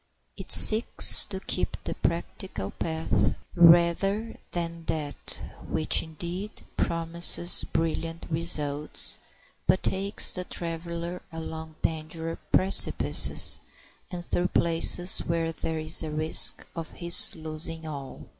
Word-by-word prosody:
It - - -9
seeks 220 +2 +7
to 190 -2 -7
keep 185 - -4
the - - -5
practical 170 - -5
path 160 -1 -2 0.2
rather 175 +6 +3 0.2
than 170 -1 -5
that 150 -3 -6 0.3
which, 155 - +2
indeed, 175 +6 -8
promises 170 +1 -1
brilliant 165 0 -4
results, 150 -3 -2 0.5
but 185 - +1
takes 195 +2 -1
the 180 - -5
traveler 170 0 -6
along 160 -1 -9
dangerous 160 +1 -5
precipices 190 +1 +5 0.5
and 175 -2 -8
through 175 +1 -2
places 170 +1 +1
where 165 -1 -3
there 160 0 -6
is 155 0 +2
a 160 - -6
risk 155 +1 +1
of 165 -2 -7
his 170 -1 +3
losing 160 0 -7
all. 140 -4 -9
165 Hz, 110 wpm, -25 LUFS, 160-175 Hz, 0.5 s, seeks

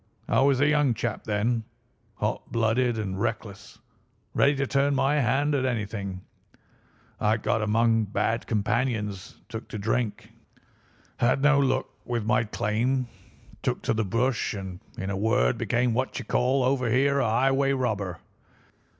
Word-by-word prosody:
I - - +3
was 135 -1 +3
a 145 - +4
young 150 -5 +3
chap 115 -1 -3
then, 110 +2 0 0.5
hot 105 +1 -3
blooded 115 +1 +1
and 95 -2 -3
reckless, 100 -4 -4 0.6
ready 140 +1 +3
to 140 0 0
turn 140 +1 +1
my 140 +2 +2
hand 140 +4 +1
at 135 -2 +1
anything; 105 -6 -3 1.0
I 110 +1 +2
got 110 - 0
among 115 +1 +2
bad 105 +3 -1
companions, 105 -2 -1
took 110 -1 -7
to - - -6
drink, 110 +1 -2 0.9
had 130 +3 +2
no 150 -1 +5
luck 130 -1 +1 0.2
with 120 -3 -2
my 120 +1 +2
claim, 120 +5 -1 0.5
took - - -2
to 115 - +1
the 110 0 0
bush, 115 +4 0
and 95 -2 -6 0.2
in 95 +1 -3
a - - -2
word 95 - +1
became 120 0 +1
what 130 +3 -1
you - - -4
would - - -24
call 130 +2 +2
over 125 -1 +1
here 140 +4 +3
a 115 - +1
highway 135 +4 +2
robber. 100 -9 -2
115 Hz, 155 wpm, -26 LUFS, 105-130 Hz, 1.0 s, no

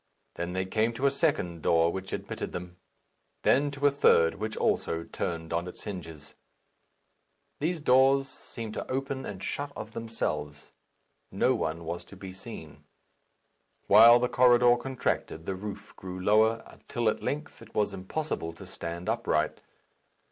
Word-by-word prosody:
Then 85 +1 -4
they 95 0 -1
came 110 +4 +1
to 130 +4 -2
a 140 - +5
second 140 - 0
door, 85 +2 +3
which 95 +1 -6
admitted - - -5
them; 90 0 -7 0.7
then 145 +2 +4
to 140 0 -3
a 145 - +6
third, 85 -12 +4
which 110 +1 -4
also 80 0 0
turned 80 -1 -4
on 85 +1 -1
its 90 - -9
hinges. 80 -7 -8 1.3
These 165 +2 -1
doors 135 0 +4
seemed 115 -4 -7
to - - -5
open 135 0 -2
and 95 -2 -7
shut 145 0 -3
of 110 +1 -7
themselves. 75 -11 -4 0.6
No - - +2
one 80 +1 -2
was 85 +1 -4
to - - -13
be 95 -1 -9
seen. 95 -6 -10 1.0
While 115 +4 +9
the 125 0 +1
corridor 120 -1 +5
contracted, 120 -9 -2
the 95 - -2
roof 100 +1 -7
grew 95 0 -7
lower, 110 +4 +3
until 120 -4 -4
at 110 - +1
length 150 -2 -4
it 115 -1 -15
was 105 -1 +1
impossible 95 - -3
to 85 - -11
stand 85 +2 -6
upright. 110 -9 0
105 Hz, 155 wpm, -29 LUFS, 85-125 Hz, 1.3 s, While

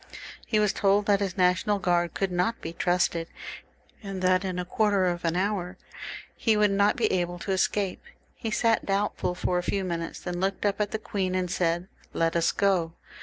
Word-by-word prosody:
He 215 - +2
was 210 -2 +2
told 200 +1 +2
that 205 -1 +3
his 195 -2 -2
National 180 +3 +3
Guard 175 -3 +1
could 195 -1 -1
not 180 +6 0
be 165 - -6
trusted, 175 -1 +1 0.7
and 195 -3 -5
that 185 +1 +3
in 185 -2 -3
a 180 - -2
quarter 200 0 +2
of 175 -1 -1
an 165 0 0
hour 200 +4 +1
more 180 +2 -10 0.6
he 220 -2 +2
would 210 -1 +4
not 200 +1 +3
be - - +1
able 175 -1 -1
to 195 - -4
escape. 190 +1 0 0.3
He 225 - -5
sat 225 0 +2
doubtful 195 -2 -1
for 180 0 0
a - - -1
few 195 +2 -1
minutes, 170 -2 -4
then 175 -1 -4
looked 195 +2 -1
up 205 0 +1
at 205 - 0
the 220 - -2
queen, 190 -3 -2
and 180 -1 -1
said, 175 0 0
" - - -28
Let 165 0 +1
us 170 0 +3
go." 185 -5 +1
185 Hz, 210 wpm, -27 LUFS, 175-200 Hz, 0.7 s, would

